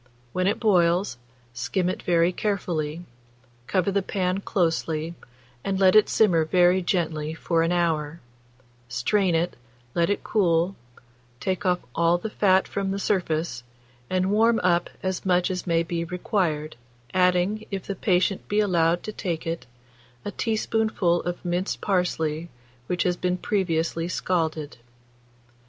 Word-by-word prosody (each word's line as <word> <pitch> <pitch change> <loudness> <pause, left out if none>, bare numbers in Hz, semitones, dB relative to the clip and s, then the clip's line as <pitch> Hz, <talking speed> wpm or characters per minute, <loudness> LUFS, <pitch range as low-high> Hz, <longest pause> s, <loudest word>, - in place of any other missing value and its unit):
When 185 0 +1
it 205 - +1
boils, 180 - +2 0.3
skim 125 +10 -1
it 185 - -2
very 170 0 +3
carefully, 175 -5 -2 0.6
cover 190 0 +1
the 200 0 +1
pan 185 0 -1
closely, 165 -4 -1 0.5
and 195 -1 -1
let 190 +1 +5
it 215 - +6
simmer 180 -7 +4
very 180 +3 +4
gently 160 -4 -1
for 165 0 0
an 165 +1 +1
hour; 165 -2 0 0.7
strain 175 - +1
it, 170 +2 0 0.4
let 170 +1 +2
it 205 - -1
cool, 180 -2 +2 0.6
take 190 0 -2
off 180 0 +2
all 170 +1 +3
the 215 +4 -5
fat 190 -3 +3
from 195 -1 -2
the 195 - -1
surface, 165 -9 -1 0.5
and 185 +1 +1
warm 225 +2 +4
up 175 -1 +2
as 185 -1 -2
much 180 0 +2
as 180 0 -4
may 165 -1 +2
be 170 0 -2
required, 165 - -2 0.4
adding, 185 +4 +2
if 195 -3 -4
the 195 - -3
patient 185 0 +1
be 205 - +1
allowed 175 -4 +2
to 215 - -4
take 175 -5 -3
it, 165 -4 -4 0.6
a 205 - -3
teaspoonful 220 -5 0
of 175 +1 -5
minced 175 +2 -1
parsley 170 -4 -1 0.4
which 180 - 0
has 180 -1 +1
been 180 0 0
previously 170 -4 -1
scalded. 160 -5 -2
180 Hz, 145 wpm, -25 LUFS, 165-195 Hz, 0.7 s, it